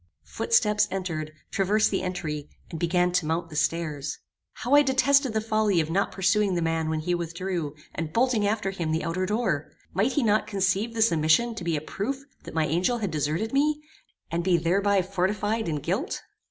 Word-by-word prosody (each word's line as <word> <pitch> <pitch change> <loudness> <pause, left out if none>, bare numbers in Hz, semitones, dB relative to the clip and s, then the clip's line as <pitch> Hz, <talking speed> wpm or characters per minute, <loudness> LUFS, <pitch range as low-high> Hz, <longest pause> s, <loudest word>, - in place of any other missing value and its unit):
Footsteps 210 - +2
entered, 170 -5 -3 0.2
traversed 205 +2 +2
the 195 - 0
entry, 160 -5 -4 0.2
and 165 - -5
began 180 +1 +2
to 180 -2 +1
mount 165 +1 -2
the - - -8
stairs. 150 -3 -1 0.4
How 245 +4 -2
I 290 - +8
detested 270 -1 +3
the 220 - +1
folly 215 -4 +2
of 160 0 -1
not 195 +4 +1
pursuing 195 +1 +2
the 170 - 0
man 165 -1 0
when 160 -1 -1
he 175 +3 -1
withdrew, 170 -2 -3 0.2
and 160 -1 -4
bolting 230 0 +2
after 205 -2 0
him 170 -5 -3
the 160 +1 0
outer 185 +3 -1
door! 195 -9 -1 0.2
Might 205 +9 +1
he 290 - +1
not 215 -1 +2
conceive 200 +3 0
this 225 -2 +4
omission 165 +9 +3
to 220 - -7
be 170 -2 0
a - - -4
proof 265 - -4 0.2
that - - -9
my 160 -1 +2
angel 175 - +1
had 205 -6 -2
deserted 155 - -1
me, 295 +2 +2 0.5
and 170 +1 -1
be 180 -1 +3
thereby 195 +4 +2
fortified 200 +3 -1
in 155 - -1
guilt? 185 - -2
185 Hz, 195 wpm, -26 LUFS, 165-215 Hz, 0.5 s, I